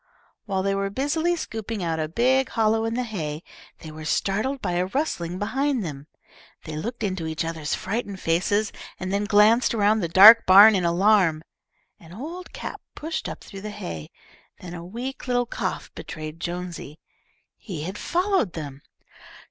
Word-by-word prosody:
While 190 -2 -1
they 195 0 +1
were 195 0 -1
busily 315 - 0
scooping 220 - -5
out 165 -1 -1
a 155 - -1
big 255 +9 +2
hollow 225 0 +1
in 225 0 -2
the 250 - 0
hay, 165 -9 -5 0.4
they 160 - -9
were 155 0 -9
startled 215 - -1
by 190 -7 -2
a 175 +1 0
rustling 185 - -2
behind 255 +3 -1
them. 145 -2 -7 0.6
They 155 -2 -7
looked 230 +9 -5
into 185 -5 -2
each 160 +1 -2
other's 160 -2 -2
frightened 200 -1 -4
faces, 205 +6 0 0.3
and 185 +1 -3
then 200 +1 0
glanced 220 +4 +4
around 215 0 +3
the 175 - -1
dark 210 +7 +9
barn 200 +4 +9
in 185 -3 +1
alarm. 175 -2 +3 0.6
An 165 0 -14
old 330 - -8
cap - - -7
pushed 320 +2 -4
up - - -8
through 195 - -10
the 210 - -5
hay. 80 - -7 0.5
Then 175 -1 -9
a 170 -1 -7
weak 245 +9 -6
little 245 -1 +1
cough - - -4
betrayed 155 0 -8
Jonesy. 175 -3 -6 0.6
He 170 -9 -7
had 185 +4 -5
followed 360 - 0
them. 145 -4 -7
195 Hz, 170 wpm, -24 LUFS, 170-230 Hz, 0.6 s, dark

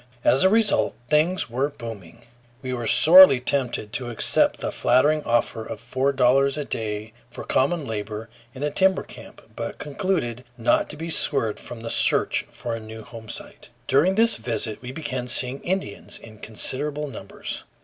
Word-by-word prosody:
As 135 - +4
a 190 - +6
result 220 0 +2 0.2
things 165 +5 +2
were 130 +5 -1
booming. 115 - -10 0.4
We 130 -1 -3
were 120 -2 -3
sorely 165 -3 +8
tempted 125 -5 -2
to 125 -2 -3
accept 115 - +3
the - - -4
flattering 145 +5 +3
offer 115 -1 0
of - - -7
four 130 +4 -1
dollars 135 +2 +3
a 145 - -3
day 105 -2 -4 0.2
for - - -8
common 150 +3 0
labor 110 -1 -5 0.3
in 135 - -6
a 150 - 0
timber 190 +4 +2
camp, - - -13
but - - -5
concluded 145 - -2
not 115 - +1
to 150 - -8
be 165 +2 -4
swerved 115 -9 +1
from 120 -2 -9
the 115 - -5
search - - +1
for 120 - -6
a 115 - -3
new 110 0 -10
homesite. 110 +1 -10 0.2
During 150 +8 +3
this 230 +2 +3
visit 115 -3 -3
we 125 0 -7
began 130 -4 -4
seeing 125 +2 0
Indians 185 - -4
in 110 -2 -14
considerable 145 +7 -3
numbers. 105 -7 -6
130 Hz, 170 wpm, -24 LUFS, 115-150 Hz, 0.4 s, sorely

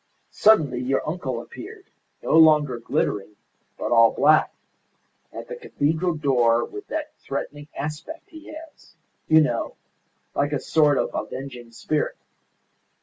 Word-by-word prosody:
Suddenly 155 - +4
your 135 +3 -1
uncle 175 +4 -3
appeared, 445 -4 -11 0.4
no - - +1
longer 150 -6 +5
glittering, 105 -2 -2 0.4
but - - -4
all 115 -1 +7
black, 155 +2 +4 0.8
at - - -8
the - - -6
cathedral 170 - -1
door 120 -6 +2
with 410 0 -10
that 305 -1 -4
threatening 145 +1 -6
aspect 155 - -6
he 315 -1 -12
has 315 0 -13 0.3
you 160 0 +6
know, 120 -6 -1 0.6
like 145 +1 0
a 145 - 0
sort 150 0 +3
of - - 0
avenging 125 -3 -6
spirit. 150 +6 -2
150 Hz, 130 wpm, -24 LUFS, 130-180 Hz, 0.8 s, all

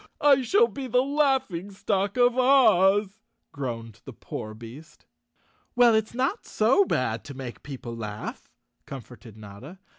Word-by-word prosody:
I 280 -2 +5
shall 410 - +3
be 275 - -7
the 250 +1 +2
laughing 265 - 0
stock 200 +1 -2
of 245 -1 +4
Oz," 215 -6 +3 0.3
groaned 115 -5 -6
the - - -10
poor 110 0 -8
beast. 120 +8 -13 0.7
"Well, 245 -1 +5
it's 220 +1 -1
not 265 - -1
so 260 - +3
bad 115 - -2
to 140 - -9
make 130 -3 -8
people 125 -4 -8
laugh," 105 -2 -7 0.4
com¬ 135 -3 -7
forted 120 -3 -15
Notta. 110 - -12
195 Hz, 145 wpm, -25 LUFS, -, 0.7 s, I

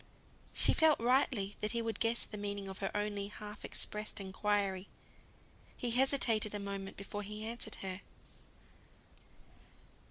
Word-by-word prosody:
She - - +8
felt 320 -2 +5
rightly 235 -4 +2
that 210 +2 -1
he 235 - 0
would 225 -1 -3
guess 230 +1 +1
the - - -7
meaning 200 -1 -4
of 190 0 -7
her 195 - -1
only 205 -1 -2
half 210 0 -8
expressed 210 0 -1
inquiry. 195 0 -1 0.9
He 245 - -2
hesitated 235 -5 +3
a - - -2
moment 200 -1 -5
before 200 +1 -5
he 210 +1 -6
answered 230 +1 -3
her. 185 0 -4
210 Hz, 135 wpm, -34 LUFS, 200-230 Hz, 0.9 s, She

